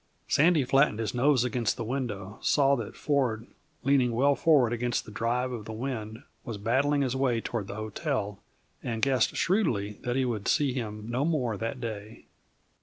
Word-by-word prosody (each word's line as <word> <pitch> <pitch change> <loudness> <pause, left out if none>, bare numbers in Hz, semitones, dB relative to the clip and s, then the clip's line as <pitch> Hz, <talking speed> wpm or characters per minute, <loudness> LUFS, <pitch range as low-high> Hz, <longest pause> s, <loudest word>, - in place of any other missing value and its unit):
Sandy 155 0 +4
flattened 135 -2 +3
his 110 -1 -2
nose 130 0 +3
against 120 -2 -1
the 120 - -3
window, 110 -5 -4
saw 140 -1 +3
that 115 -5 -6
Ford, 125 -6 0 0.4
leaning 130 -3 +3
well 140 +5 +3
forward 140 -6 +3
against 120 0 -1
the - - -10
drive 120 +4 -1
of 115 -4 -6
the 110 - -6
wind, 110 -2 -5 0.2
was 115 -4 -5
battling 140 +7 +1
his 130 -1 -1
way 130 -3 +1
toward 110 -3 -4
the - - -6
hotel, 110 - -3 0.4
and 115 -2 -4
guessed 130 -4 +2
shrewdly 115 - 0
that 120 0 -2
he 130 -1 +2
would 110 -5 -3
see 145 -4 +2
him 105 -4 -5
no 120 +4 -1
more 140 -9 0
that 115 +5 -4
day. 110 -2 -7
120 Hz, 180 wpm, -28 LUFS, 110-135 Hz, 0.4 s, Sandy